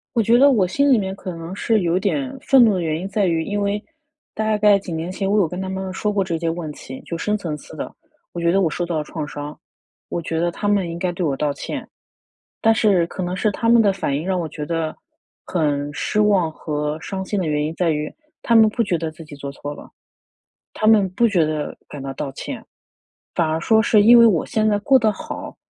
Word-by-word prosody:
我 235 - +4
觉 235 +3 +4
得 280 +2 +7
我 205 -8 +3
心 280 +9 +2
里 255 - +6
面 190 -2 -2
可 185 -3 -7
能 165 +3 -7
是 220 +1 +1
有 175 +1 +1
点 265 +7 -1
愤 265 -2 +6
怒 215 - +3
的 185 - -1
原 160 -1 -1
因 190 - -4
在 200 0 0
于， 165 -2 +1
因 205 +3 -2
为， 200 +1 -1 0.5
大 215 0 0
概 210 -1 +5
几 190 -2 -8
年 165 +2 -3
前 195 +1 -2
我 210 - +2
有 185 - +3
跟 180 +4 -5
他 190 - -4
们 190 0 -4
说 210 +2 -1
过 200 -2 +1
这 170 -3 -2
些 165 0 -1
问 165 -2 -4
题， 130 -2 -9
就 170 - -4
深 210 +5 0
层 165 -6 -4
次 150 - -12
的， - - -6 0.4
我 175 - -4
觉 170 0 +3
得 195 +2 +3
我 165 - +2
受 175 - -3
到 170 -2 -2
了 155 - -1
创 150 -1 -5
伤， 145 +1 -7 0.5
我 170 - -2
觉 160 0 -3
得 175 +1 +1
他 205 - -4
们 200 -4 +1
应 170 - -5
该 180 0 -1
对 175 +1 -4
我 140 -3 0
道 150 -1 0
歉。 140 - -6 0.7
但 225 -1 +4
是， 195 -6 +3
可 185 - -5
能 180 +1 -2
是 215 - +1
他 230 - -2
们 235 0 +6
的 200 -2 +3
反 165 -7 -2
应 155 +4 -4
让 185 -1 0
我 165 - -3
觉 150 - -6
得， 165 -1 -2 0.5
很 145 -4 -1
失 210 - -1
望 200 -6 +3
和 150 0 -3
伤 190 +2 -5
心 205 - -2
的 185 - -1
原 150 -1 0
因 155 +2 -3
在 175 -2 +1
于， 150 -1 -2 0.3
他 235 - +2
们 220 -1 +7
不 230 - 0
觉 195 -5 0
得 160 -1 -3
自 160 +1 -12
己 150 -2 -11
做 140 0 -6
错 145 +1 -7
了， - - -12 0.9
他 215 - -1
们 210 -3 +5
不 235 +6 +2
觉 180 -6 +2
得 155 -1 -3
感 145 - -8
到 135 0 -5
道 140 0 -4
歉。 - - -7 0.7
反 170 - +2
而 160 +1 -1
说 220 +3 +4
是 220 -1 +4
因 235 +3 +8
为 235 - +8
我 180 -8 +2
现 220 -2 0
在 210 -1 +3
过 265 +6 +4
得 220 -1 +2
好， - - -7
180 Hz, 275 characters per minute, -21 LUFS, 160-210 Hz, 0.9 s, 因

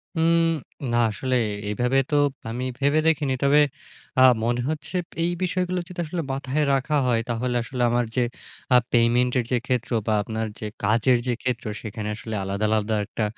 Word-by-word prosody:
হুম, 165 +1 +3 0.5
না 120 - +2
আসলে 130 +4 -2 0.3
এভাবে 125 +5 +1
তো 150 - +1 0.3
আমি 120 +3 -3 0.2
ভেবে 145 +2 +3
দেখিনি। 150 -4 +2
তবে 140 +2 +5 0.6
আ - - +6 0.2
মনে 120 +1 +1
হচ্ছে 155 +3 -4 0.3
এই 170 - +1
বিষয়গুলো 180 0 0
যদি 180 -2 -9
আসলে 170 +2 -3
মাথায় 135 +2 -1
রাখা 135 +3 0
হয়, 120 -2 +2
তাহলে 120 +1 -1
আসলে 125 +2 -5
আমার 120 0 +1
যে 125 - +2 0.5
আ - - +8 0.2
পেমেন্টের 120 +1 +3
যে 125 - +3
ক্ষেত্র 125 -3 -1 0.2
বা 110 - +2
আপনার 110 +1 -3
যে - - -5 0.2
কাজের 115 +4 +3
যে 125 - +2
ক্ষেত্র, 125 -2 -2 0.2
সেখানে 110 -1 -5
আসলে 110 0 -6
আলাদা, 100 +2 -1
আলাদা 110 0 +1
একটা 110 - -3
125 Hz, 170 wpm, -24 LUFS, 115-145 Hz, 0.6 s, আ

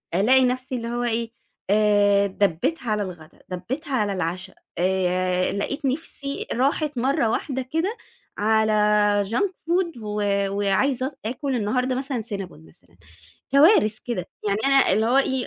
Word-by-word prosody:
ألاقي 255 +7 +5
نَفْسي 255 +1 -2
اللي 230 -1 -4
هو 240 +1 -2
إيه 230 -1 -1 0.4
آآ 205 -1 +4
دَبِّتها 205 - -1
على 210 - 0
الغدا، 170 -4 -10
دَبِّتها 265 - -5
على 205 -4 0
العشا 180 0 -4 0.2
آآ 185 0 +1
لقيت 275 +8 -3
نِفْسي 280 0 -3
راحت 280 +3 0
مَرّة 260 0 +1
واحدة 265 +3 -2
كده 325 - -2 0.4
على 220 +1 +2 0.6
junk 315 - +1
food 345 -3 -2
و 210 0 -3 0.3
وعايزة 205 +7 +1
اط 275 -1 -11
آكل 260 +3 -2
النهاردة 250 +4 0
مثلًا 265 -2 -3
سينابون 195 - -7
مثلًا. 80 - -23 0.5
كوارث 275 - +5
كده 220 -8 -3 0.2
يعني 200 +1 +1
أنا 275 0 +4
اللي 220 +1 +2
هو 245 +3 +2
إي 265 -2 0
235 Hz, 145 wpm, -23 LUFS, 200-270 Hz, 0.6 s, ألاقي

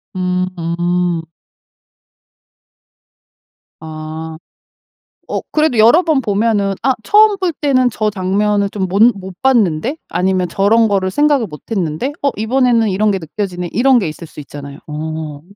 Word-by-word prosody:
음. 180 -1 -1 2.6
아. 160 0 -7 0.9
어 - - -1
그래도 305 -5 +1
여러 230 +10 +6
번 315 -6 +1
보면은 205 -2 0
아 265 -1 +2
'처음 425 -1 +5
볼 365 -3 -1
때는 260 -4 +1
저 215 0 -1
장면을 200 +1 0
좀 190 -3 -2
몬 210 +6 +4
못 190 -2 -9
봤는데?' 240 - +2
아니면 185 -1 0
'저런 220 +5 +3
거를 190 -2 0
생각을 290 -1 +2
못 150 -5 -11
했는데 190 - -2
어 280 - +2
이번에는 230 0 +2
이런 205 +2 +1
게 195 - -1
느껴지네?' 180 +1 -5
이런 250 +3 +4
게 190 - -2
있을 165 +2 -9
수 155 - -13
있잖아요. 140 -1 -9
어. 155 -1 -5
200 Hz, 250 characters per minute, -16 LUFS, 175-240 Hz, 2.6 s, 여러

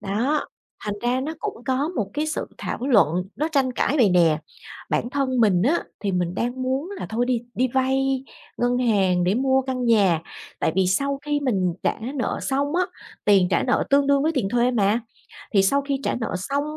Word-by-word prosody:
Đó, 230 +9 -1 0.4
thành 210 -1 -2
ra 245 +2 +1
nó 305 +4 -4
cũng 235 - -6
có 265 +4 0
một 220 - -3
cái 300 +1 -1
sự 310 - -3
thảo - - -4
luận 180 - +3
nó 310 +3 0
tranh 270 -3 +2
cãi 275 - 0
vậy 235 -8 +4
nè, 170 -4 +4 0.5
bản 240 - 0
thân 265 -2 0
mình 190 -5 +4
á 300 +9 +2 0.2
thì 200 -2 -1
mình 180 -1 -1
đang 245 +5 -2
muốn 265 +7 -2
là - - -5
thôi 235 +2 0
đi 245 -2 0
đi 255 +1 +1
vay 265 +1 0 0.3
ngân 245 +1 +1
hàng 195 -7 +2
để 185 - +2
mua 265 +2 +2
căn 255 -1 -3
nhà, 200 -8 +3 0.4
tại - - +1
vì 190 -1 +3
sau 275 +9 0
khi 295 0 -1
mình 190 -11 0
trả - - 0 0.2
nợ 255 -4 -2
xong 280 +3 -1
á, 365 - +3 0.4
tiền 195 -3 +4
trả 170 - +2
nợ 250 - +1
tương 280 0 +4
đương 280 -1 +3
với 315 +2 +1
tiền 225 -9 0
thuê 245 +2 +2
mà, 215 -1 +2 0.5
thì 195 -2 +5
sau 280 +9 +3
khi 275 -1 -2
trả - - 0
nợ 235 -2 -3
xong 275 +10 -2
250 Hz, 210 wpm, -23 LUFS, 200-275 Hz, 0.5 s, thì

